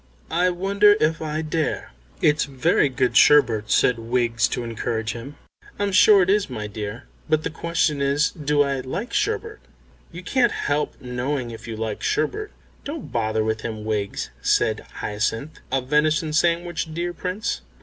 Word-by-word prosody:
"I 175 Hz, +3 st, +3 dB
wonder 200 Hz, +3 st, +4 dB
if 160 Hz, +1 st, +1 dB
I 155 Hz, 0 st, -2 dB
dare." 155 Hz, 0 st, -2 dB, 0.3 s
"It's 150 Hz, 0 st, +3 dB
very 135 Hz, +1 st, +2 dB
good 125 Hz, -2 st, 0 dB
sherbet," 115 Hz, -8 st, +5 dB
said 125 Hz, -2 st, +3 dB
Wiggs, 115 Hz, 0 st, +1 dB
to 125 Hz, -, -3 dB
encourage 110 Hz, -1 st, -3 dB
him. 125 Hz, +5 st, -8 dB, 0.4 s
"I'm 205 Hz, -1 st, 0 dB
sure 195 Hz, 0 st, +7 dB
it 180 Hz, -, -1 dB
is, 205 Hz, -4 st, +1 dB
my 110 Hz, -5 st, -5 dB
dear. 105 Hz, +3 st, -6 dB, 0.3 s
But 155 Hz, 0 st, +2 dB
the -, -, -3 dB
question 165 Hz, -3 st, 0 dB
is, 140 Hz, +3 st, +2 dB
Do 150 Hz, -2 st, +1 dB
I 140 Hz, -1 st, -1 dB
like 160 Hz, -, -5 dB
sherbet?" 435 Hz, 0 st, -1 dB, 0.5 s
"You 170 Hz, +1 st, -9 dB
can't 240 Hz, +4 st, +2 dB
help 145 Hz, +1 st, -2 dB
knowing 125 Hz, 0 st, -3 dB
if 115 Hz, -, -10 dB
you 115 Hz, -, -5 dB
like 110 Hz, -1 st, -4 dB
sherbet." 405 Hz, -, -1 dB, 0.3 s
"Don't 300 Hz, +2 st, -6 dB
bother 110 Hz, -1 st, 0 dB
him, 110 Hz, -1 st, -6 dB
Wiggs," 105 Hz, -2 st, -2 dB
said -, -, +2 dB, 0.2 s
Hyacinth, 110 Hz, +7 st, -2 dB
"a 135 Hz, -1 st, +1 dB
venison 150 Hz, +3 st, +1 dB
sandwich, 170 Hz, 0 st, 0 dB
dear 175 Hz, +1 st, -2 dB
Prince?" 180 Hz, -, -3 dB
145 Hz, 160 wpm, -23 LUFS, 115-170 Hz, 0.5 s, sure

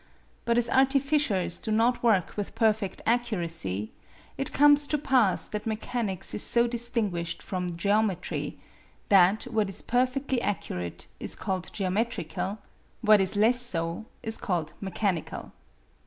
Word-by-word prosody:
But 235 Hz, 0 st, +2 dB
as 240 Hz, -1 st, +2 dB
artificers 270 Hz, -, +2 dB
do -, -, -5 dB
not 230 Hz, +3 st, +2 dB
work 210 Hz, -7 st, +2 dB
with 205 Hz, -1 st, -4 dB
perfect 220 Hz, -3 st, 0 dB
accuracy, 170 Hz, -, -1 dB, 0.4 s
it 270 Hz, -, -2 dB
comes 290 Hz, 0 st, +5 dB
to 300 Hz, -, +1 dB
pass 255 Hz, -9 st, +2 dB
that 210 Hz, +1 st, -4 dB
mechanics 220 Hz, -3 st, -2 dB
is -, -, -2 dB
so 235 Hz, 0 st, +3 dB
distinguished 230 Hz, -8 st, -2 dB
from 180 Hz, -3 st, -4 dB
geometry, 200 Hz, -1 st, 0 dB, 0.5 s
that 195 Hz, +2 st, +5 dB
what 220 Hz, -5 st, -1 dB
is 195 Hz, -, -3 dB
perfectly 255 Hz, +1 st, 0 dB
accurate 90 Hz, -, -4 dB
is -, -, -3 dB
called 185 Hz, -2 st, -3 dB
geometrical; 195 Hz, -2 st, -2 dB, 0.4 s
what 215 Hz, -3 st, +6 dB
is 190 Hz, +1 st, +1 dB
less 230 Hz, +4 st, +4 dB
so 170 Hz, -3 st, -2 dB, 0.2 s
is 225 Hz, 0 st, -3 dB
called 175 Hz, -9 st, -2 dB
mechanical. 190 Hz, -3 st, -2 dB
215 Hz, 130 wpm, -27 LUFS, 185-240 Hz, 0.5 s, what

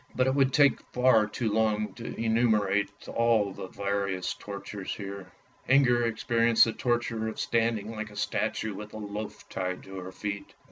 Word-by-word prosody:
But 130 Hz, -, +3 dB
it 130 Hz, -, +2 dB
would 135 Hz, -1 st, +3 dB
take 140 Hz, 0 st, +4 dB
far 125 Hz, -4 st, +4 dB
too 110 Hz, +1 st, -2 dB
long 110 Hz, -1 st, +1 dB
to 115 Hz, -, -7 dB
enumerate 110 Hz, -3 st, +2 dB, 0.2 s
all 115 Hz, -4 st, +2 dB
the 95 Hz, -, -7 dB
various 100 Hz, -1 st, -2 dB
tortures 100 Hz, -1 st, -6 dB
here. 100 Hz, -2 st, -7 dB, 0.4 s
Inger 120 Hz, -3 st, +5 dB
experienced 115 Hz, 0 st, +3 dB
the 115 Hz, -, -2 dB
torture 120 Hz, -2 st, -1 dB
of 110 Hz, -, -5 dB
standing 115 Hz, -2 st, 0 dB
like 110 Hz, -1 st, -5 dB
a 105 Hz, -, -14 dB
statue 105 Hz, +1 st, -1 dB
with 105 Hz, +2 st, -8 dB
a -, -, -6 dB
loaf 105 Hz, 0 st, -6 dB
tied 90 Hz, -1 st, -3 dB
to 95 Hz, 0 st, -8 dB
her 90 Hz, 0 st, -7 dB
feet. 100 Hz, +1 st, -5 dB
110 Hz, 170 wpm, -28 LUFS, 100-115 Hz, 0.4 s, Inger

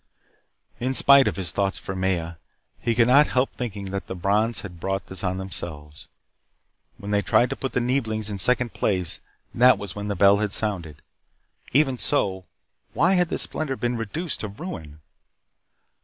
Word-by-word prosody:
In 130 Hz, +2 st, -1 dB
spite 140 Hz, 0 st, +6 dB
of -, -, -1 dB
his 90 Hz, -5 st, -2 dB
thoughts 100 Hz, +2 st, -1 dB
for 95 Hz, -, -6 dB
Maya, 90 Hz, -3 st, -1 dB, 0.4 s
he 115 Hz, -1 st, 0 dB
could 115 Hz, 0 st, +5 dB
not 140 Hz, +5 st, +6 dB
help 130 Hz, +1 st, 0 dB
thinking 100 Hz, -5 st, -5 dB
that 100 Hz, 0 st, -4 dB
the 95 Hz, -, -5 dB
Brons 105 Hz, +5 st, 0 dB
had 90 Hz, -4 st, -9 dB
brought 95 Hz, +2 st, -2 dB
this 95 Hz, -1 st, -4 dB
on 90 Hz, -1 st, 0 dB
themselves. 75 Hz, -6 st, -7 dB, 0.9 s
When 100 Hz, 0 st, -7 dB
they 105 Hz, 0 st, +2 dB
tried 120 Hz, +5 st, +2 dB
to -, -, -1 dB
put 135 Hz, -, -5 dB
the 125 Hz, -, +1 dB
Neeblings 115 Hz, -4 st, -1 dB
in 100 Hz, -2 st, -4 dB
second 125 Hz, +3 st, +1 dB
place, 90 Hz, -5 st, 0 dB, 0.3 s
that 125 Hz, +2 st, +6 dB
was 100 Hz, -2 st, -7 dB
when 105 Hz, 0 st, -5 dB
the 100 Hz, -, -2 dB
bell 100 Hz, +2 st, +5 dB
had 105 Hz, -1 st, -1 dB
sounded. 90 Hz, -9 st, -2 dB, 0.7 s
Even 135 Hz, -2 st, +2 dB
so, 95 Hz, -10 st, 0 dB, 0.5 s
why 180 Hz, +5 st, +3 dB
had 180 Hz, -2 st, +2 dB
this -, -, 0 dB
splendor 145 Hz, -4 st, -3 dB
been 120 Hz, -1 st, -2 dB
reduced 145 Hz, -, -3 dB
to 105 Hz, -, -4 dB
ruin? 90 Hz, -, -8 dB
105 Hz, 175 wpm, -24 LUFS, 95-125 Hz, 0.9 s, spite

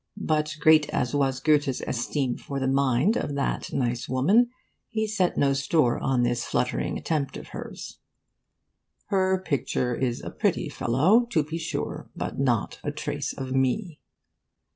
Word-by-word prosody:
But, 155 Hz, -5 st, 0 dB
great 155 Hz, 0 st, +5 dB
as 125 Hz, -, -1 dB
was 135 Hz, -2 st, +1 dB
Goethe's 145 Hz, -2 st, +2 dB
esteem 125 Hz, +1 st, -1 dB
for 140 Hz, -1 st, -5 dB
the 130 Hz, -, 0 dB
mind 135 Hz, -, +2 dB
of 145 Hz, -, -2 dB
that 140 Hz, -, -2 dB
nice 120 Hz, -2 st, -1 dB
woman, 195 Hz, -, +4 dB, 0.4 s
he 220 Hz, -1 st, -1 dB
set 210 Hz, -4 st, 0 dB
no 140 Hz, -1 st, +3 dB
store 140 Hz, -2 st, +2 dB
on 130 Hz, -2 st, +1 dB
this 120 Hz, 0 st, 0 dB
fluttering 125 Hz, +1 st, -1 dB
attempt 150 Hz, -4 st, -2 dB
of -, -, -10 dB
hers: -, -, -8 dB, 1.1 s
'her 190 Hz, -1 st, +2 dB
picture 125 Hz, -4 st, 0 dB
is 120 Hz, -1 st, -1 dB
a -, -, -5 dB
pretty -, -, 0 dB
fellow, 185 Hz, -, +3 dB
to 160 Hz, -10 st, +2 dB
be 160 Hz, +3 st, -5 dB
sure, 160 Hz, -, -4 dB
but -, -, -4 dB
not 120 Hz, -6 st, 0 dB
a -, -, -1 dB
trace 145 Hz, -1 st, -3 dB
of 130 Hz, -1 st, -6 dB
me. 145 Hz, -, 0 dB
140 Hz, 155 wpm, -26 LUFS, 130-160 Hz, 1.1 s, great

